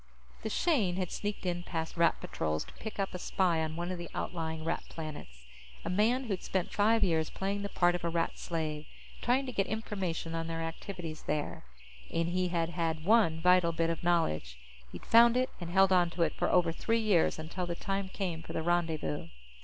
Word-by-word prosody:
The 220 Hz, -, -3 dB
Shane 220 Hz, -, +2 dB
had 185 Hz, -2 st, -2 dB
sneaked 205 Hz, -2 st, -4 dB
in 175 Hz, -1 st, -1 dB
past 165 Hz, -2 st, -4 dB
Rat 170 Hz, 0 st, +3 dB
patrols 75 Hz, -1 st, -2 dB
to -, -, -14 dB
pick 220 Hz, -1 st, -7 dB
up 195 Hz, -, -1 dB
a 180 Hz, -, -4 dB
spy 175 Hz, -3 st, +1 dB
on 155 Hz, 0 st, -3 dB
one 175 Hz, +2 st, -3 dB
of 180 Hz, -, -4 dB
the 170 Hz, -, -6 dB
outlying 160 Hz, -2 st, -3 dB
Rat 165 Hz, +1 st, -1 dB
planets, 145 Hz, -, -8 dB, 0.4 s
a -, -, -1 dB
man 225 Hz, +7 st, +3 dB
who'd 200 Hz, -7 st, -2 dB
spent 185 Hz, -2 st, -2 dB
five 220 Hz, +2 st, +3 dB
years 160 Hz, -3 st, +2 dB
playing 200 Hz, +1 st, -2 dB
the 200 Hz, -, -3 dB
part 175 Hz, -2 st, +3 dB
of 175 Hz, -, -3 dB
a 170 Hz, -, +1 dB
Rat 165 Hz, 0 st, -1 dB
slave, 155 Hz, -2 st, -3 dB, 0.3 s
trying 255 Hz, +3 st, +2 dB
to 255 Hz, -, -4 dB
get 200 Hz, -5 st, 0 dB
information 190 Hz, -7 st, -3 dB
on 165 Hz, 0 st, -2 dB
their 165 Hz, 0 st, -3 dB
activities 165 Hz, -1 st, -6 dB
there. 150 Hz, -, -2 dB, 0.5 s
And 165 Hz, 0 st, 0 dB
he 180 Hz, +1 st, +1 dB
had 170 Hz, -2 st, 0 dB
had 165 Hz, -2 st, -2 dB
one 200 Hz, -7 st, +4 dB
vital 180 Hz, -1 st, +5 dB
bit 165 Hz, 0 st, +1 dB
of 165 Hz, -, -4 dB
knowledge. 80 Hz, -, +1 dB, 0.3 s
He'd -, -, -9 dB
found 235 Hz, +1 st, +7 dB
it 255 Hz, 0 st, +1 dB
and 175 Hz, -, -5 dB
held 190 Hz, +1 st, +5 dB
on 175 Hz, -2 st, +4 dB
to 170 Hz, 0 st, 0 dB
it 160 Hz, -, 0 dB
for -, -, 0 dB
over 175 Hz, -2 st, +4 dB
three 225 Hz, +7 st, 0 dB
years, 205 Hz, -7 st, +3 dB
until 165 Hz, +3 st, -4 dB
the 170 Hz, -, -2 dB
time 195 Hz, +1 st, -2 dB
came 180 Hz, -5 st, -3 dB
for -, -, -8 dB
the 160 Hz, -, -1 dB
rendezvous. 165 Hz, -, 0 dB
175 Hz, 210 wpm, -31 LUFS, 165-195 Hz, 0.5 s, found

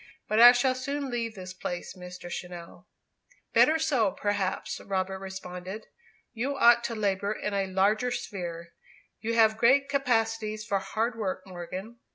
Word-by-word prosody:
"But 215 Hz, -, +1 dB
I 240 Hz, +1 st, +11 dB
shall 250 Hz, +1 st, +2 dB
soon 275 Hz, +1 st, -3 dB
leave 230 Hz, -2 st, -3 dB
this 185 Hz, -1 st, -8 dB
place, 180 Hz, 0 st, -5 dB
Mr. 180 Hz, -1 st, -9 dB
Channell." 175 Hz, 0 st, -8 dB, 0.7 s
"Better 315 Hz, -, +5 dB
so, 280 Hz, -10 st, +2 dB
perhaps," 200 Hz, -2 st, -2 dB
Robert 190 Hz, -1 st, -2 dB
responded. 190 Hz, +1 st, -7 dB, 0.5 s
"You 265 Hz, +4 st, -2 dB
ought 240 Hz, -2 st, +6 dB
to 230 Hz, -, -3 dB
labour 200 Hz, -1 st, 0 dB
in 210 Hz, -1 st, -4 dB
a 195 Hz, -1 st, 0 dB
larger 205 Hz, +6 st, +2 dB
sphere. 175 Hz, -8 st, -5 dB, 0.5 s
You 230 Hz, +1 st, -2 dB
have 220 Hz, -1 st, +4 dB
great 275 Hz, +4 st, +4 dB
capacities 225 Hz, -5 st, 0 dB
for 200 Hz, -1 st, 0 dB
hard 220 Hz, +5 st, -2 dB
work, 190 Hz, -4 st, -3 dB
Morgan." 185 Hz, +5 st, -7 dB
210 Hz, 150 wpm, -28 LUFS, 185-235 Hz, 0.7 s, I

